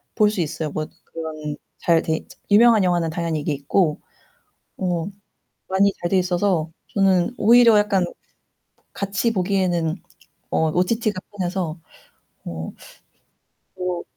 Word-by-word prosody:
볼 210 -1 +4
수 200 - -1
있어요. 155 -1 -3
뭐 155 +1 -3 0.2
그런 155 -2 -6 0.2
잘 165 -1 +3
돼 160 -1 -1 0.3
유명한 220 0 +6
영화는 175 -3 +1
당연히 165 -2 -2
이게 150 0 -1
있고 150 +3 0 0.8
뭐 180 -1 -2 0.6
많이 195 +1 +3
잘 175 - -1
돼 190 - +3
있어서 180 -2 +1 0.2
저는 190 0 +3
오히려 230 0 +6
약간 205 -3 +2 0.9
같이 200 +4 -1
보기에는 180 -4 0 0.5
어 160 -1 +2
OTT가 195 +3 0
편해서 180 -4 -3 0.7
어 80 -1 -5 1.0
뭐 180 -1 -3
180 Hz, 230 characters per minute, -22 LUFS, 160-200 Hz, 1.0 s, 유명한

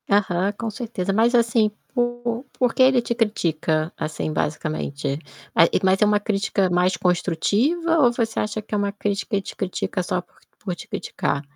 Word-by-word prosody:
Aham, 195 -1 +2
com 225 +2 -4
certeza. 205 -4 -3
Mas 230 +4 +3
assim, 230 -2 +3 0.2
por 240 0 -1 0.2
por 245 -2 +2
que 260 - +5
ele 260 -1 +5
te 235 0 -2
critica, 165 -8 0
assim 155 0 -3
basicamente? 150 -1 -2 0.5
Eh, 165 - +5
mas 190 +1 +3
é - - +7
uma 210 0 +3
crítica 200 -2 0
mais 180 +1 +2
construtiva 220 - +1
ou 245 -5 +5
você 225 -2 -1
acha 215 +1 -2
que 215 - -11
é - - +2
uma 200 0 0
crítica, 200 +1 -2
e - - -1
te - - -9
critica 185 0 -2
só 180 +1 -1
por - - -29 0.2
por 185 -4 -4
te - - -11
criticar? 140 - -2
205 Hz, 180 wpm, -23 LUFS, 180-235 Hz, 0.5 s, é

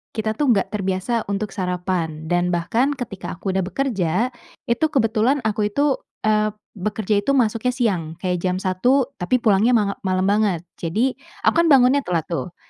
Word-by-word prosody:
Kita 220 0 -1
tuh 260 -7 +4
enggak 195 - -1
terbiasa 195 +3 -1
untuk 200 0 -2
sarapan 180 -4 -3
dan 175 0 +2
bahkan 225 +11 0
ketika 200 -9 -6
aku 190 +2 -3
sudah 190 - 0
bekerja, 215 0 0 0.4
itu 240 +7 +2
kebetulan 250 -1 +1
aku 210 -1 0
itu, 280 +5 +1 0.2
eee, 215 -1 +2 0.2
bekerja 210 +1 0
itu 275 +7 +1
masuknya 245 +1 +1
siang. 180 -10 -1
Kayak 180 -1 0
jam 180 +1 -1
1.00, 245 +9 +2
tapi 180 +8 +1
pulangnya 220 +3 +4
manga 200 -2 0
malam 185 0 +1
banget. 200 -4 +1 0.2
Jadi, 220 +11 0 0.3
aku - - +3
kan 335 - +4
bangunnya 270 -1 +5
telat 170 -3 0
tuh, 165 +3 -3
210 Hz, 165 wpm, -21 LUFS, 185-245 Hz, 0.4 s, bangunnya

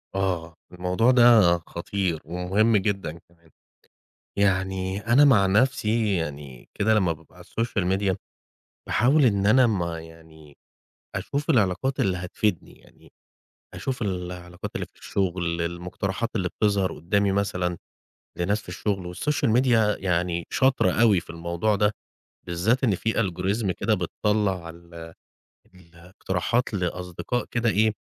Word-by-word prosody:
آه، 90 -4 -2 0.2
الموضوع 90 +7 +1
ده 115 -8 +6
خطير 85 -1 -2
ومهم 95 +7 +1
جدًا 95 -5 -2
كمان، 85 -1 -26 0.9
يعني 95 -1 0
أنا 125 +5 +6
مع 115 -9 +5
نفسي 110 0 +2
يعني 70 -6 -6
كده 110 +2 +2
لمّا 95 -6 +2
بابقى 80 +2 -15
على 90 - -13
الSocial 95 -4 -1
Media، 95 -2 0 0.7
باحاول 135 +5 +3
إن 100 -4 +2
أنا 125 +4 +5
ما 85 -6 -1
يعني 80 -2 -16 0.6
أشوف 140 - -3
العلاقات 125 - +1
اللي 95 -2 +1
هتفيدني، 90 0 -2
يعني - - -21 0.6
أشوف 130 -3 -4
العلاقات 90 -2 -5
اللي - - -3
في - - -28
الشغل، 85 -3 -2
المقترحات 90 +6 -3
اللي 90 -3 0
بتظهر 100 -3 0
قدامي 100 +5 0
مثلًا 90 -3 -1 0.6
لناس 100 +5 0
في - - -12
الشغل، 95 -4 -3
والSocial 145 0 0
Media 115 -5 +3
يعني 85 -1 0
شاطرة 130 -8 +2
أوي 105 -2 +4
في 85 - -16
الموضوع 85 +5 -1
ده، 105 +1 +2 0.6
بالذات 95 +10 +1
إن 110 -6 +3
في 110 +5 -1
Algorithm 95 +1 -1
كده 85 - 0
بتطلّع 100 -5 -1
ال 85 -1 -11 0.6
الاقتراحات 90 +6 -3
لأصدقاء 90 +5 -3
كده 120 0 +1
إيه، 110 +2 +2
95 Hz, 130 wpm, -25 LUFS, 85-110 Hz, 0.9 s, ده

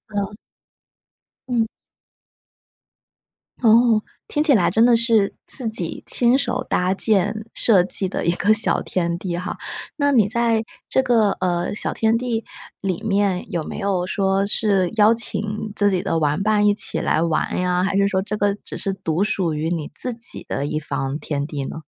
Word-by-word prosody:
嗯。 200 +1 -2 1.1
嗯。 230 -2 +1 1.9
哦， 230 -1 +4 0.3
听 295 - 0
起 305 -3 +4
来 195 -7 +3
真 225 +2 +4
的 240 -1 +5
是 225 -3 +2
自 250 -4 -1
己 180 -7 -1
亲 245 +2 +3
手 250 -3 -2
搭 180 +1 +1
建、 215 +1 +1
设 195 -6 +4
计 190 0 +1
的 180 - -3
一 170 - +3
个 205 +4 +2
小 220 - +2
天 170 -2 -2
地 175 -1 -4
哈。 180 - -5 0.4
那 285 -1 +2
你 210 -5 +4
在 230 -1 +1 0.2
这 265 - +2
个， 225 -5 +3
呃， 175 +1 -1
小 - - -3
天 225 +1 +2
地 235 -2 -2 0.3
里 190 -3 -3
面 200 -3 0
有 170 - -1
没 - - -6
有 190 -3 -1
说 195 0 +1
是 200 -4 +1
邀 215 +1 +5
请 215 -2 -2
自 205 -1 +2
己 180 -1 0
的 165 -1 -1
玩 150 +3 0
伴 210 0 +2
一 205 - +4
起 - - -2
来 155 - +1
玩 165 +1 0
呀？ 180 0 +1
还 195 0 0
是 200 0 +3
说 190 -1 0
这 210 +2 -4
个 205 0 +1
只 - - -7
是 195 - -2
独 185 -1 -1
属 180 -6 -1
于 155 +2 -2
你 165 -4 -3
自 250 -1 -2
己 230 +1 -8
的 140 - -2
一 155 +1 -2
方 140 -1 -3
天 145 -2 -3
地 145 -3 -5
呢？ 160 - -7
200 Hz, 195 characters per minute, -21 LUFS, 180-225 Hz, 1.9 s, 的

